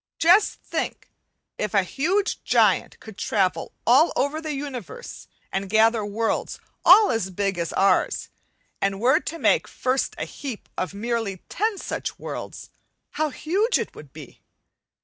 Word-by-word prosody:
Just 360 +6 +5
think, - - -4 0.5
if 210 0 -2
a 200 - +5
huge 360 - -1
giant - - +2
could 220 -2 -12
travel 185 -6 0
all 275 +8 +5
over 290 +3 0
the 310 -2 -4
universe 280 - -7 0.2
and 195 0 -3
gather 220 +1 +4
worlds, 220 +2 -2 0.2
all 410 +4 +8
as 225 -5 -1
big 195 -1 -2
as 170 -1 -2
ours, 195 +1 +2 0.5
and 195 0 0
were 260 +7 +4
to 335 - -6
make - - +2
first 260 +1 -1
a - - -3
heap 260 -7 -7
of 185 +2 -3
merely 225 -3 -3
ten 430 +1 -1
such - - -4
worlds, - - -7 0.4
how 310 0 0
huge 385 - +1
it - - -4
would - - -13
be! - - -12
235 Hz, 150 wpm, -24 LUFS, 200-315 Hz, 0.5 s, all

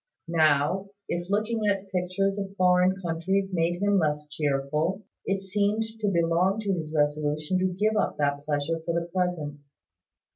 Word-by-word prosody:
Now, 160 +4 +2 0.2
if 175 +1 -3
looking 215 +1 0
at 195 -1 -1
pictures 190 +2 0
of 195 0 -5
foreign 185 0 +3
countries 185 +4 0
made 170 0 +1
him 205 -1 +4
less 150 -2 0
cheerful, 150 +5 -1 0.2
it 195 0 0
seemed 205 +3 +1 0.2
to 210 - 0
belong 175 +2 +2
to 200 -2 0
his 160 -4 -4
resolution 150 +3 0
to 185 - +2
give 215 +3 +1
up 210 - 0
that 145 -1 0
pleasure 150 +2 -1
for 170 0 0
the 170 - -5
present. 175 -5 -2
180 Hz, 155 wpm, -27 LUFS, 155-195 Hz, 0.2 s, him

